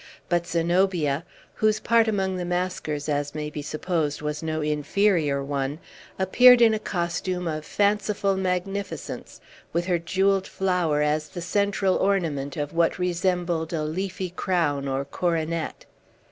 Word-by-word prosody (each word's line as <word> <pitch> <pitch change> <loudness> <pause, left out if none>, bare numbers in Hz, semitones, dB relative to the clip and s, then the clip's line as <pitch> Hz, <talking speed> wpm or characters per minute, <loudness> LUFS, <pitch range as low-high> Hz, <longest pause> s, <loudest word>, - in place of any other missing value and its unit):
But 175 -1 +1
Zenobia 170 -3 +1 0.3
(whose 215 0 +2
part 230 0 +3
among 190 -3 0
the 180 - -3
maskers, 175 -4 -2
as 145 -1 -1
may 150 0 -4
be 150 - -5
supposed, 155 0 -2
was 150 0 -3
no 160 -1 -2
inferior 150 -1 +1
one) 140 +1 -2 0.4
appeared 245 +6 +7
in 230 -2 +6
a 215 - 0
costume 180 -1 -2
of 155 -1 -3
fanciful 205 -1 +1
magnificence, 190 +1 -3 0.3
with 170 +1 0
her 175 -2 +1
jewelled 190 +3 +1
flower 180 -6 +1
as 150 +1 0
the 175 - -7
central 195 +1 +1
ornament 165 -8 0
of 145 -1 -3
what 165 0 +2
resembled 175 -2 -1
a 155 -2 -1
leafy 185 +3 -3
crown, 165 -7 0
or 135 +1 -1
coronet. 165 +1 -2
175 Hz, 140 wpm, -25 LUFS, 150-190 Hz, 0.4 s, appeared